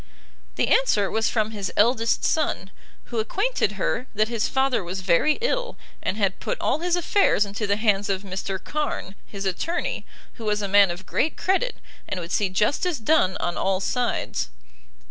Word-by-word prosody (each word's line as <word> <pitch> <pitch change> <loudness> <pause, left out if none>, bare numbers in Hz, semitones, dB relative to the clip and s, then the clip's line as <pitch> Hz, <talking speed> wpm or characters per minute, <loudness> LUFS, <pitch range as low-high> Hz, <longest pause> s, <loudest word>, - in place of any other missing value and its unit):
The - - +1
answer 210 - +3
was 220 +1 +1
from 220 -1 0
his 200 -3 -4
eldest 230 +1 +3
son, 245 -11 0 0.3
who 235 - -4
acquainted 380 - 0
her 230 +5 -1
that 215 +2 +2
his 230 -3 0
father 265 -5 +1
was 185 +2 -4
very 185 - +3
ill, - - -1 0.2
and 200 - -1
had 195 -3 0
put - - -3
all - - +1
his 350 +1 +1
affairs 350 - +3
into 205 +1 -3
the 200 - +2
hands 205 -2 +1
of 195 0 -1
Mr 190 0 -3
Carn, 295 -5 -3
his 200 -1 -6
attorney, 335 - -2 0.4
who - - -5
was 210 -1 0
a - - 0
man 200 0 +6
of 175 +2 -6
great 310 - 0
credit, 385 +7 +1 0.3
and 185 - -2
would 170 -1 -6
see 200 -2 +1
justice 280 - +1
done 225 -6 +2
on 175 - -2
all 190 -1 +1
sides. 245 - -1
215 Hz, 180 wpm, -24 LUFS, 195-300 Hz, 0.4 s, man